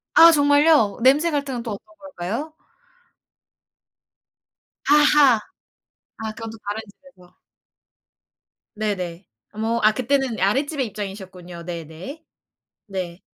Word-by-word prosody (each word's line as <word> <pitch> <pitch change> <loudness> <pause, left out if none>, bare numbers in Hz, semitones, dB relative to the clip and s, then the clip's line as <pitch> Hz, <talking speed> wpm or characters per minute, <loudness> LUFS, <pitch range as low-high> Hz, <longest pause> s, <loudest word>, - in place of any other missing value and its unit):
아 335 +1 +10
정말요? 290 -6 +4
냄새 290 +7 +4
갈등은 275 -5 -2
또 230 - -5
어떤 210 +1 -10
걸까요? 280 - -6 2.4
아하. 295 -3 +6 0.8
아 220 -1 -4
그건 225 +1 -7
또 225 - -11
다른 205 +2 -3
집에서. 200 -6 -21 1.4
네네. 190 -4 -4 0.2
어머 225 +2 -1
아 215 - +6
그때는 260 -1 0
아랫집의 270 +6 0
입장이셨군요. 190 -4 -8
네네. 170 - -8 0.6
네. 185 -3 -5
225 Hz, 210 characters per minute, -22 LUFS, 195-285 Hz, 2.4 s, 아